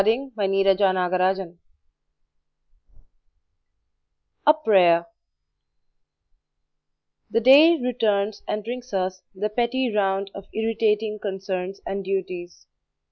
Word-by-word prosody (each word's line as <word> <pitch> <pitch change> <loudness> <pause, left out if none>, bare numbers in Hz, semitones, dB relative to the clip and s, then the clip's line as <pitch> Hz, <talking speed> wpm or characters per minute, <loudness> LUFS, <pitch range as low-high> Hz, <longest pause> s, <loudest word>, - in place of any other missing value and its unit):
HANS 250 +6 0
CHRISTIAN 195 -2 +2
ANDERSEN 180 0 0
(Adapted) 190 -3 -4 2.9
A 300 - +8
PRAYER 180 - +3 2.2
The - - +1
day 290 +8 +7
returns 220 -4 -1
and 210 0 -3
brings 245 0 -6
us 185 0 -2
the 205 +3 -2
petty 240 +1 -1
round 195 -1 0
of 195 - -10
irritating 220 -1 0
concerns 190 -1 -5
and 195 0 -4
duties. 185 -2 -5
200 Hz, 90 wpm, -23 LUFS, 190-225 Hz, 2.9 s, A